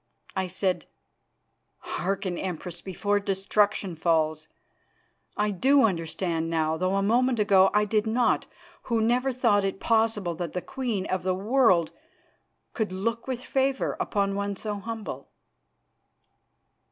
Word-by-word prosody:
I 190 -1 -1
said: 185 0 -1 0.9
"Hearken, 195 -1 -3
Empress, 175 -1 -5
before 205 +2 0
destruction 200 -1 0
falls. 155 -1 +1 0.9
I 210 0 +1
do 270 +9 +4
understand 165 -3 -1
now, 160 -1 +1
though 185 +3 0
a 195 - +1
moment 245 +4 +2
ago 195 -2 +5
I 210 0 +3
did 210 +1 0
not, 230 +2 +1 0.4
who 230 -1 +2
never 245 +4 +2
thought 230 -5 +2
it 195 0 -2
possible 220 -5 +1
that 165 -1 -5
the 180 - -2
queen 235 -8 -3
of 185 -1 -1
the 185 0 0
world 195 -5 +3 0.8
could 220 -5 -2
look 230 +6 -2
with 255 -1 -4
favour 270 0 0
upon 200 -2 0
one 200 0 -2
so 210 +1 -4
humble." 225 +1 -6
200 Hz, 130 wpm, -26 LUFS, 185-225 Hz, 0.9 s, ago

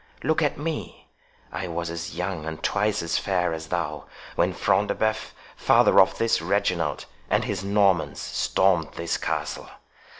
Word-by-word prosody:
Look 160 0 +2
at 150 - +1
me—I 150 - -7
was 85 0 -3
as 85 0 -5
young 90 -3 -3
and 80 -1 -6
twice 105 -1 +1
as 85 0 0
fair 90 -4 0
as 80 0 -6
thou, 80 -3 -3 0.3
when - - +2
Front 105 - +1
de - - -1
Bœuf, 110 0 -1 0.3
father - - +5
of - - +2
this 115 -4 +2
Reginald, 85 -4 0 0.2
and - - +2
his 95 -2 -3
Normans, 100 -3 +2
stormed 90 -5 +1
this 85 0 -1
castle. - - -3
90 Hz, 155 wpm, -25 LUFS, 85-105 Hz, 0.3 s, father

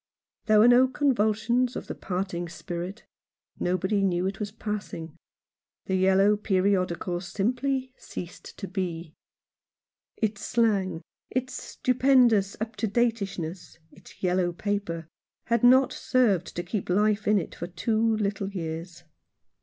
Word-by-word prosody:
There 215 -1 +5
were 215 +3 +7
no 245 +2 +6
convulsions 245 -2 +1
of - - -5
the - - -5
parting 180 -2 -3
spirit. 175 +4 -6 0.5
Nobody 185 +3 0
knew 180 -2 +1
it 195 +1 -3
was 210 -1 -3
passing. 205 -7 -5 0.7
The 190 - -2
yellow 190 +2 +4
periodical 185 -3 0
simply 255 +7 -1
ceased 175 -1 -9
to 195 - -5
be. 175 -4 -4 1.0
Its 210 -2 -1
slang, 200 -7 +1 0.3
its 255 0 -2
stupendous 250 -7 +2
up 220 +1 -4
to 220 - 0
dateishness, 195 -7 -2
its - - -17
yellow 180 -1 +2
paper, 200 -4 -3 0.4
had 235 0 0
not 260 +2 +6
served 235 -9 +1
to 175 - -2
keep 195 +2 -4
life 210 +3 +2
in 210 0 +5
it 180 - -3
for 170 - -6
two 210 +6 -1 0.2
little 200 -1 -1
years. 170 -2 -6
200 Hz, 130 wpm, -27 LUFS, 180-225 Hz, 1.0 s, were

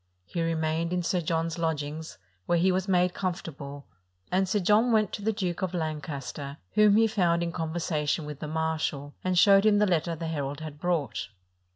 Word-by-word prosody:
He 170 - -3
remained 165 +1 0
in 180 -1 0
Sir 180 +1 0
John's 165 0 -1
lodgings, 160 -1 -3 0.3
where 175 - +3
he 185 +3 +3
was 185 +1 0
made 180 -1 +3
comfortable; 150 -6 -5 0.5
and 185 +1 +2
Sir 210 - +2
John 210 +6 +4
went 215 -4 +3
to - - -4
the 220 +2 +1
Duke 185 -5 -3
of 185 -1 -2
Lancaster, 145 -3 -4
whom 210 -1 +5
he 225 +1 +5
found 175 -6 +2
in 170 - -2
conversation 160 -2 -1
with 150 -1 -7
the 155 - -5
marshal, 155 -2 -2
and 185 -1 0
showed 195 +2 +7
him 215 -1 +5
the 210 - +4
letter 170 -3 0
the 165 - -5
herald 145 -3 -3
had 155 -2 -8
brought. 165 -8 -1
165 Hz, 190 wpm, -28 LUFS, 155-185 Hz, 0.5 s, showed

